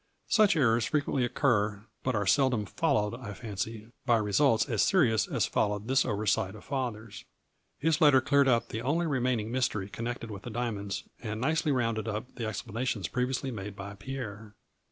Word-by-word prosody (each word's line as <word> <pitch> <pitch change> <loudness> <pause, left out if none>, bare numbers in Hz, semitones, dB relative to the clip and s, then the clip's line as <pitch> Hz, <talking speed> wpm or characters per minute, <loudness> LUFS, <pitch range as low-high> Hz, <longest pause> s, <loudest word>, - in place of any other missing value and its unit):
Such 215 -5 +5
errors 120 -6 +3
frequently 145 -3 0
occur 115 -6 +1 0.2
but 130 -2 -1
are 105 -1 0
seldom 125 -1 +3
followed, 105 +2 0
I 115 -4 -7
fancy, 110 +1 -5
by 120 - +4
results 110 +3 +3
as 115 -6 +1
serious 115 - +3
as - - 0
followed 105 +1 -1
this 130 0 +3
oversight 105 -1 0
of 105 - -12
father's. 115 -6 -4 0.5
His 160 +3 +1
letter 145 -4 +7
cleared 140 +1 +3
up 120 -3 +2
the 110 - -4
only 160 +7 +1
remaining 125 -6 0
mystery 120 -6 -1
connected 115 0 -5
with 100 -2 -7
the 120 - -7
diamonds, 100 -5 -3 0.2
and 110 -2 -4
nicely 155 +4 +1
rounded 115 -4 0
up 110 +3 -4
the 115 -3 -4
explanations 110 0 -3
previously 130 +1 -1
made 105 -3 -6
by 100 +1 -7
Pierre. 105 -2 -7
115 Hz, 170 wpm, -29 LUFS, 105-130 Hz, 0.5 s, letter